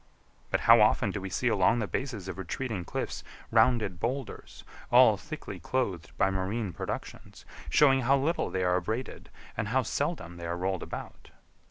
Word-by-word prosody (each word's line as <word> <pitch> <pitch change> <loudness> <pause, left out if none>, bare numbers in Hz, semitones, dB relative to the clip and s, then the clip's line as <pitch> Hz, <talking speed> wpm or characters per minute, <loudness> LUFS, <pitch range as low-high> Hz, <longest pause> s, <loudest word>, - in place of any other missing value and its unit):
But - - 0
how 115 -1 +7
often 105 0 +3
do 100 - -4
we 95 - -5
see 125 +7 -1
along 105 0 +3
the 115 - 0
bases 110 -4 -4
of 95 0 -6
retreating 100 - -4
cliffs - - -4 0.3
rounded 110 -5 +3
boulders, 130 +4 -5 0.3
all - - +7
thickly - - -8
clothed 100 -11 -2
by 95 - +3
marine 95 +1 -2
productions, - - -7 0.2
showing 135 - +5
how 135 +3 +3
little 155 +5 0
they 95 -1 -1
are 90 0 +2
abraded 110 +8 -4 0.3
and - - -2
how - - +1
seldom 85 +1 -3
they 85 -1 -6
are 85 +1 -2
rolled 95 0 -1
about! - - -8
105 Hz, 170 wpm, -29 LUFS, 95-125 Hz, 0.3 s, how